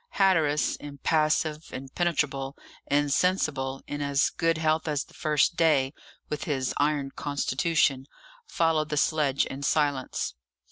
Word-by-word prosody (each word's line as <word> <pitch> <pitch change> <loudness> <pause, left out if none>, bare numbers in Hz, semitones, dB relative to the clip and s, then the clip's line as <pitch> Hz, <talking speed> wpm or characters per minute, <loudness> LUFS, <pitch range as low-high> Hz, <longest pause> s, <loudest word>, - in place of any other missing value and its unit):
Hatteras, 160 -7 +2
impassive, 155 +2 -1
impenetrable, 135 -1 -2 0.3
insensible, 145 -2 +1
in 145 0 -5
as 140 0 +2
good 165 -1 0
health 160 0 +1
as 145 -2 0
the - - -21
first 155 +1 +1
day, 145 -4 +3 0.3
with 150 - -4
his 135 -5 -1
iron 145 -2 0
constitution, 140 -1 0 0.4
followed 160 -2 +1
the 150 - -2
sledge 145 -3 +2
in 135 - -7
silence. 145 -2 0
145 Hz, 120 wpm, -27 LUFS, 140-160 Hz, 0.4 s, day